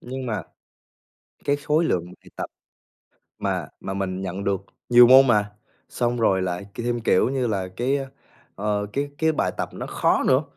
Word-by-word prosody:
nhưng 130 +1 -6
mà 105 -6 -2 1.0
cái 145 0 +2
khối 150 +3 +1
lượng 90 - 0
bài 90 - -16
tập - - -3 0.9
mà - - -2
mà 95 - -5
mình 95 -1 -3
nhận 95 +1 -4
được 100 -1 -1 0.2
nhiều 120 0 +8
môn 130 +2 +8
mà, 105 -4 +2 0.4
xong 120 0 -1
rồi 95 -4 +3
lại 90 +2 -3
thêm, 120 0 -2
kiểu 110 -1 +3
như 130 -2 0
là, 95 -5 -2
cái, 130 +4 +1 0.6
ờ, 105 0 -1
cái 145 +1 -2
cái 160 0 +2
bài - - 0
tập - - -2
nó - - -6
khó - - +1
nữa. 130 +3 +4
120 Hz, 175 wpm, -24 LUFS, 95-130 Hz, 1.0 s, nhiều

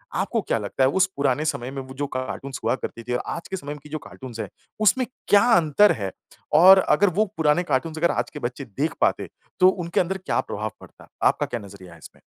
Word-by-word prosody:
आपको 200 +5 0
क्या 150 - -1
लगता 105 +5 -1
है 130 - +5
उस 190 - +5
पुराने 140 +1 +1
समय 130 -4 -2
में 135 0 -5
वो 130 0 -10
जो 145 +2 -2
कार्टून्स 130 +1 -5
हुआ - - +2
करती 115 -3 -7
थी 125 - -4
और 125 - 0
आज 170 - -8
के 190 - -3
समय 145 -3 -6
की 150 - -13
जो 155 - -3
कार्टून्स 125 -5 -10
है - - -3 0.3
उसमें 230 +5 +4 0.2
क्या 205 - +7
अंतर 170 +5 +4
है? 100 -3 -3 0.4
और 185 +5 +8
अगर 190 +3 +3
वो 215 - +4
पुराने 160 +2 +2
कार्टून्स 160 0 -1
अगर 170 +2 +2
आज - - -2
के 150 - -8
बच्चे 130 +2 -4
देख 135 +8 -2
पाते - - +1 0.3
तो 185 - +7
उनके 175 -3 -2
अंदर 190 +2 0
क्या - - 0
प्रभाव 110 +1 -5
पड़ता? - - -16 0.2
आपका - - +3
क्या 120 - -4
नज़रिया 95 -3 -12
है - - -14
इसमें? - - -15
145 Hz, 235 wpm, -24 LUFS, 125-175 Hz, 0.4 s, और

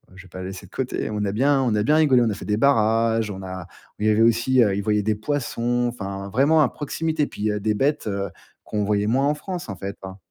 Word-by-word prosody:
je 95 - -12
vais 95 - -17
pas 95 - -9
la 90 - -5
laisser 95 +1 -8
de - - -27
côté. 130 -4 -3
On 105 -1 -2
a 100 - -1
bien 135 +5 +2
on 120 -4 +1
a 105 - +1
bien 150 +6 +3
rigolé, 135 -6 +5
on 115 - +1
a - - -1
fait - - -9
des 105 0 0
barrages, 115 -4 +2
on 95 0 -7
a 95 -2 -7
oh, - - -23
il 105 - 0
y - - +5
avait 110 +1 +3
aussi, 115 +3 +3
heu, 100 -2 +1
ils 100 - -2
voyaient 105 -1 +1
des 110 0 +1
poissons, 120 -1 -1
enfin, 100 -4 -6
vraiment 145 +8 +3
à 140 - +4
proximité, 155 +1 -2
puis, 105 0 -2
heu, 105 - -2
des 110 +1 +1
bêtes, 140 +1 0
heu, 100 -2 -2 0.4
qu'on 105 -1 -2
voyait 105 0 +1
moins 135 +5 +2
en 150 - +2
France, 180 - -6
en 100 - -4
fait, 100 +2 -6
hein. 95 0 -8
110 Hz, 280 wpm, -23 LUFS, 100-130 Hz, 0.4 s, rigolé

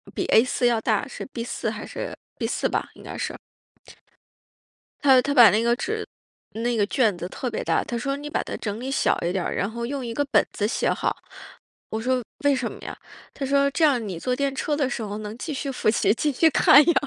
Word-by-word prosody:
比 - - -1
A4 245 +2 +3
要 235 -2 +3
大， 220 +5 0
是 - - -7
B4 240 -3 -4
还 - - -6
是 - - -6 0.2
B4 - - 0
吧， - - -2
应 - - -14
该 - - -7
是。 - - -4 1.7
他 265 -3 +7
他 280 - -1
把 240 -5 +9
那 215 +2 +2
个 235 0 +3
纸 435 +9 -3 0.5
那 235 +2 -1
个 205 - +3
卷 220 -6 +2
子 175 +1 -5
特 250 +6 -4
别 220 - -3
大， - - +1
他 240 - -4
说： 275 +4 -2
“你 295 +1 -7
把 - - -1
它 - - -5
整 210 0 -4
理 265 +2 -4
小 270 - +1
一 170 +1 0
点 190 -2 -1
儿， - - -2
然 195 +3 -1
后 235 +1 -4
用 270 -1 -4
一 230 - -4
个 290 +4 0
本 - - +3
子 205 - -1
写 - - 0
好。” - - -1 0.7
我 220 0 -3
说： 255 +1 +1 0.2
“为 285 -1 +4
什 250 -3 -2
么 - - -11
呀？” - - -7 0.4
他 275 - -4
说： 280 +1 +3
“这 315 +3 +3
样 250 -7 +2
你 175 -4 -5
坐 250 +5 -1
电 280 0 -1
车 295 +2 -1
的 280 -3 0
时 240 - -3
候 210 -1 -4
能 215 +2 -7
继 305 - -5
续 275 0 -3
复 250 - +1
习， 210 -2 +3
继 295 +5 0
续 320 +5 +4
看 285 0 +7
呀。” 340 - +4
250 Hz, 255 characters per minute, -24 LUFS, 220-280 Hz, 1.7 s, 把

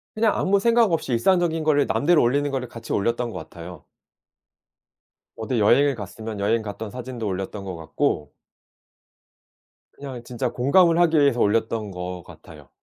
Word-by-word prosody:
그냥 215 -1 +2
아무 195 +1 +2
생각 230 -1 +3
없이 160 -5 -1
일상적인 165 +5 +2
거를 145 -2 +3
남들이 170 +4 +2
올리는 145 +4 +2
거를 130 -2 -3
같이 115 -1 -10
올렸던 115 +3 -1
것 90 - -7
같아요. 85 -1 -10 1.5
어디 115 +1 -2
여행을 140 +6 +4
갔으면 110 +1 -7
여행 110 +3 +1
갔던 110 +1 -6
사진도 125 -2 -6
올렸던 95 +1 -4
것 95 -2 -5
같고 75 -2 -2 1.6
그냥 130 -4 -8
진짜 125 +1 -3
공감을 165 +8 +3
하기 165 -2 +4
위해서 140 -4 +3
올렸던 110 0 0
것 90 -1 -6
같아요. - - -15
120 Hz, 330 characters per minute, -23 LUFS, 105-145 Hz, 1.6 s, 여행을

